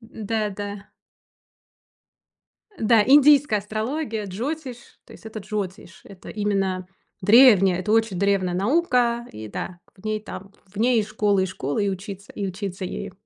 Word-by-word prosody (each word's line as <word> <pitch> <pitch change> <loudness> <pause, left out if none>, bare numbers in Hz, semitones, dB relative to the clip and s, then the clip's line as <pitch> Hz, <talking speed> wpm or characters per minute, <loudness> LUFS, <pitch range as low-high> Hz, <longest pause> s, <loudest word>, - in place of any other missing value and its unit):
Да 220 -2 -3
да. 205 0 -7 1.9
Да, 220 0 +4
индийская 285 -3 +6
астрология, 220 +3 -3
джотиш, 250 - -5 0.3
то - - -16
есть - - -14
это 220 0 -7
джотиш. 190 -3 -6
Это 195 -2 -13
именно 195 -3 -1 0.3
древняя, 200 -4 +6
это 210 +3 -1
очень 220 -5 +2
древняя 195 -2 +1
наука, 240 - +1
и 110 0 -8
да, 175 - -6 0.2
в 185 - -20
ней 215 0 -1
там 195 -2 -9
в 190 +2 -23
ней 235 +1 +3
и - - 0
школы, 210 -2 +1
и 190 - 0
школы, 180 +2 -2
и - - +1
учиться 195 +1 -8
и 200 - -4
учиться 190 0 -5
ею. 195 +1 -5
205 Hz, 150 wpm, -23 LUFS, 190-225 Hz, 1.9 s, индийская